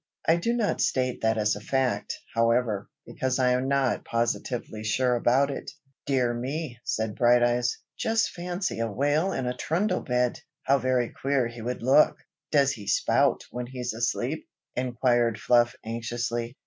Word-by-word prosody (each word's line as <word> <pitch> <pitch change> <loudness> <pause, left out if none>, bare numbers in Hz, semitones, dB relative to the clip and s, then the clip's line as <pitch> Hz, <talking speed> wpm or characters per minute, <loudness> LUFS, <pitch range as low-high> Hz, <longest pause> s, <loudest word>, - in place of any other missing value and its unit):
I 165 - +5
do 230 +8 0
not 230 -4 0
state 130 -1 0
that 110 0 +2
as 105 -1 +2
a 105 - -8
fact, 130 +3 -1 0.2
however, 115 -3 +1 0.2
because 130 -1 -2
I 125 -1 +3
am 125 +1 +1
not 135 -2 +1
positively 115 -1 -2
sure 125 +4 +1
about 125 +4 +3
it." - - -6 0.4
"Dear 125 -4 +2
me!" 130 +1 -4
said 110 -1 -2
Brighteyes. 120 +1 +3 0.2
"Just 225 0 +1
fancy 180 - -3
a 115 -1 -1
whale 145 - +1
in 130 - -2
a 125 0 -2
trundle 180 +8 0
bed! 125 -1 0 0.2
how 140 +1 +3
very 125 -1 +1
queer 135 -3 0
he 120 0 -9
would 120 +1 -4
look!" 135 +5 +5 0.3
"Does 140 -2 +4
he 105 -6 -8
spout 105 - +2
when 125 0 -4
he's 125 -2 -4
asleep?" 120 +5 -2 0.3
inquired 120 -2 +1
Fluff 120 0 +3
anxiously. 115 +1 -3
125 Hz, 160 wpm, -27 LUFS, 120-135 Hz, 0.4 s, I